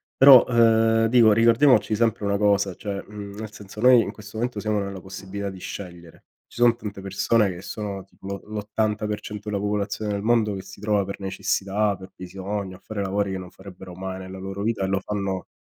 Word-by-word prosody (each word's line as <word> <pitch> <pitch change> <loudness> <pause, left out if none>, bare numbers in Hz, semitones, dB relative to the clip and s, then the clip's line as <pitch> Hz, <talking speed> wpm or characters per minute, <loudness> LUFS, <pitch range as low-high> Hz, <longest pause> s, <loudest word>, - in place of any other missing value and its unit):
Però, 135 -2 +9
ehm, 115 -1 +4
dico 115 -2 +6
ricordiamoci 115 0 +4
sempre 115 -1 +1
una 100 0 +1
cosa, 100 -2 +2
cioè, 100 -2 -5
mhmm, 100 -1 -8
nel 110 -1 -6
senso 105 +1 -10
noi 125 -1 +7
in 100 - -5
questo 105 0 -11
momento 120 -2 -2
siamo 105 0 -1
nella 100 -2 -6
possibilità 95 +1 -6
di 95 - -9
scegliere. 85 -4 -9 0.2
Ci 120 - -9
son 120 -1 +6
tante 105 -4 -7
persone 100 +2 +1
che 90 +1 -7
sono 100 -3 -5
tipo 95 - -14
lo 100 0 -5
l'80% 105 0 -3
della 100 -1 -1
popolazione 105 0 -2
del 100 - -2
mondo 110 -2 +2
che 95 - -5
si 100 - -13
trova 105 -1 +1
per 100 - -6
necessità, 100 +1 0
per 95 0 -12
bisogno, 95 +1 -5
a - - -24
fare 110 -2 -4
lavori 100 0 -1
che 95 - -3
non 90 -1 -9
farebbero 95 -2 -12
mai 95 0 -5
nella 95 0 -8
loro 95 +1 -6
vita 110 -2 -1
e - - 0
lo 95 0 +1
fanno 100 -2 -3
100 Hz, 205 wpm, -24 LUFS, 95-110 Hz, 0.2 s, Però